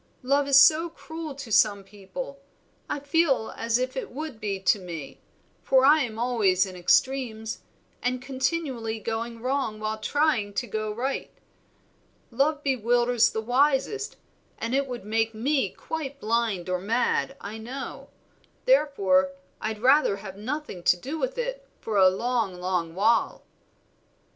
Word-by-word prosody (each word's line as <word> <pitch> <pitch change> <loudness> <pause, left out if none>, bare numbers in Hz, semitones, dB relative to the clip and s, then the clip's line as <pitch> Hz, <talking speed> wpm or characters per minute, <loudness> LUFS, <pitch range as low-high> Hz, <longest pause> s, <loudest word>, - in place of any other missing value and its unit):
Love 280 +2 +2
is 275 -1 +6
so 315 +4 +6
cruel 320 -2 -8
to 270 -5 -8
some 205 -2 +4
people, 205 +8 -8 0.5
I - - -2
feel 285 -5 +1
as 230 0 +1
if 255 +1 -2
it 260 - -4
would 285 -3 -6
be 200 -3 -2
to 195 +2 +3
me, 170 -6 -8 0.4
for 265 0 +4
I 305 +3 +6
am 225 -5 -3
always 215 -6 +2
in 185 -1 -9
extremes, 220 +3 +1 0.4
and 250 0 0
continually 260 -3 -2
going 230 +1 -4
wrong 255 -5 -1
while 215 0 -3
trying 255 -7 +1
to 245 - -1
go 215 -2 -3
right. 255 +6 -3 1.0
Love 285 +4 +1
bewilders 245 -2 +3
the 220 - -3
wisest, 280 - +1 0.4
and 230 +2 -3
it 275 +1 +1
would 245 -5 -6
make 225 +1 0
me 260 -1 +1
quite 280 - -6
blind 220 -6 0
or 180 0 0
mad, 240 +6 0
I 210 +2 -7
know; 255 +5 -7 0.6
therefore 195 - +3 0.3
I'd 215 0 -4
rather 270 -5 +5
have 195 -1 -9
nothing 245 -2 -5
to 180 - +4
do 280 - -5
with - - -2
it, - - -4
for 215 -2 -2
a 190 -1 +7
long, 225 0 -1
long 180 -2 -2
while." 220 +5 +2
240 Hz, 150 wpm, -26 LUFS, 210-275 Hz, 1.0 s, a